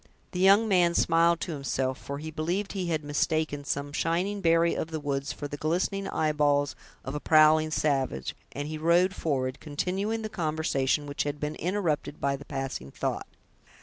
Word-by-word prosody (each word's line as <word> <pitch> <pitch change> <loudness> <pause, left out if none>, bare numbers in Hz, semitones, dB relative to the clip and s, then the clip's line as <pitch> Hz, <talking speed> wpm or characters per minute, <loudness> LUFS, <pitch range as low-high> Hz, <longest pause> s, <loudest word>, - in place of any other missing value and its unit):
The 180 - -4
young 200 +4 +6
man 175 -4 +3
smiled 170 0 +4
to 175 - -3
himself, 135 -3 -2
for 140 - -6
he 160 +2 -6
believed 175 +6 -2
he 185 -3 -2
had 160 -2 -1
mistaken 145 0 0
some 140 0 -3
shining 180 +6 0
berry 165 -1 +4
of - - -2
the 160 -1 -3
woods 140 -1 -2
for 145 - -5
the 145 - -6
glistening 180 +6 -1
eyeballs 145 -2 +1 0.3
of 135 - -4
a 150 - -2
prowling 155 0 +5
savage, 135 - 0 0.2
and 145 +1 -4
he 155 0 -5
rode 175 +4 +3
forward, 135 -6 -2
continuing 190 +9 -2
the - - -2
conversation 155 -6 0
which 145 0 -3
had 145 0 -2
been 150 +1 -2
interrupted 170 -5 -2
by 140 0 +1
the 140 +1 -10
passing 135 - -4
thought. - - -3
155 Hz, 180 wpm, -28 LUFS, 145-170 Hz, 0.3 s, young